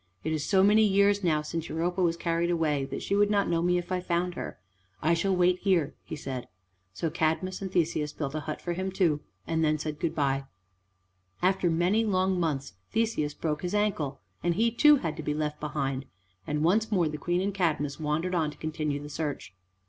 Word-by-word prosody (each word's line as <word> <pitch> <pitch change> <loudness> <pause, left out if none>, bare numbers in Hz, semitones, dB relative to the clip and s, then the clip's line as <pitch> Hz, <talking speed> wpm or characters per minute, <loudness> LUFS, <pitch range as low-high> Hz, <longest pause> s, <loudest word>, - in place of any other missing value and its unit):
"It 160 - -1
is 155 -2 -1
so 190 +2 +4
many 210 +2 +6
years 200 0 +3
now 155 -3 +2
since 165 +1 -4
Europa 175 +3 -1
was 170 -2 +2
carried 170 0 0
away 155 -5 +1
that 135 - -5
she 200 - 0
would 205 0 +4
not 205 -1 +2
know 165 -1 +1
me 180 +1 +2
if 175 +1 -4
I 185 - +1
found 180 0 -1
her. - - -6 0.4
I 165 +3 +2
shall 190 +3 +1
wait 180 0 +3
here," 175 -7 +2
he - - -6
said. 130 -4 -5 0.4
So 100 - -3
Cadmus 170 +4 0
and 190 -1 -4
Theseus 155 -4 0
built 140 -2 -4
a 155 - -1
hut 155 0 -5
for 175 - -1
him 190 +2 -2
too, 170 -6 +2 0.2
and 160 0 0
then 155 0 +3
said 150 0 -4
good 170 - -1
by. 135 -2 +1 1.0
After 185 -1 +3
many 175 +7 +2
long 190 -3 +1
months 145 - -1 0.2
Theseus 220 -10 0
broke 150 -2 -2
his 180 +3 -2
ankle, 165 -10 0 0.2
and 175 -1 +1
he 230 +4 +3
too 295 +6 +6
had 165 - -2
to - - -4
be 150 -1 -2
left 150 -1 -2
behind, 140 -3 -2 0.4
and 150 0 0
once 215 +7 +2
more 180 -5 +3
the 150 0 -4
Queen 175 +3 0
and 195 +2 -1
Cadmus 155 -6 0
wandered 160 +4 -1
on 160 -4 +1
to 150 - -11
continue 155 -2 -2
the 145 - -8
search. 150 -6 -4
165 Hz, 215 wpm, -28 LUFS, 150-185 Hz, 1.0 s, many